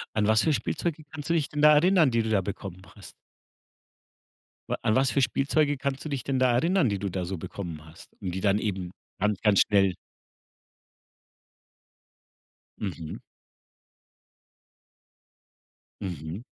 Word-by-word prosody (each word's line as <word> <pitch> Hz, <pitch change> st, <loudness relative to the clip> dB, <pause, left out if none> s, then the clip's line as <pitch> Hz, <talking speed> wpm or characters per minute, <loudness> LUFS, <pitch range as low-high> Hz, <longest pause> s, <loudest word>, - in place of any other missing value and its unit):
An 105 Hz, -1 st, +2 dB
was 110 Hz, 0 st, +4 dB
für 160 Hz, -, +2 dB
Spielzeuge 150 Hz, +5 st, -2 dB
kannst 150 Hz, 0 st, -8 dB
du 170 Hz, -, +4 dB
dich 155 Hz, -4 st, +1 dB
denn 150 Hz, 0 st, -3 dB
da 150 Hz, 0 st, +8 dB
erinnern, 170 Hz, -2 st, +4 dB
die 115 Hz, -1 st, +2 dB
du 110 Hz, -, -3 dB
da 105 Hz, -3 st, +3 dB
bekommen 95 Hz, -1 st, -6 dB
hast? 100 Hz, -, -12 dB, 1.6 s
Wa -, -, +1 dB
an 110 Hz, -, +2 dB
was 130 Hz, +2 st, +3 dB
für 140 Hz, -, +1 dB
Spielzeuge 145 Hz, +2 st, +1 dB
kannst 140 Hz, +1 st, -3 dB
du 155 Hz, -, -5 dB
dich 135 Hz, -4 st, -3 dB
denn 135 Hz, -1 st, -1 dB
da 130 Hz, -1 st, +3 dB
erinnern, 165 Hz, -, +2 dB
die 100 Hz, -, -1 dB
du 100 Hz, -, -3 dB
da 90 Hz, 0 st, -3 dB
so 95 Hz, +1 st, -4 dB
bekommen 80 Hz, -3 st, -7 dB
hast 80 Hz, +1 st, -15 dB
und 90 Hz, -2 st, -4 dB
die 95 Hz, -, -3 dB
dann 100 Hz, 0 st, +3 dB
eben 95 Hz, -5 st, -3 dB, 0.3 s
ganz, 105 Hz, 0 st, 0 dB
ganz 105 Hz, -3 st, +4 dB
schnell 95 Hz, -3 st, +3 dB, 2.9 s
Mhm. 85 Hz, -6 st, -5 dB, 2.8 s
Mhm. 85 Hz, -, -5 dB
110 Hz, 150 wpm, -27 LUFS, 95-140 Hz, 2.9 s, da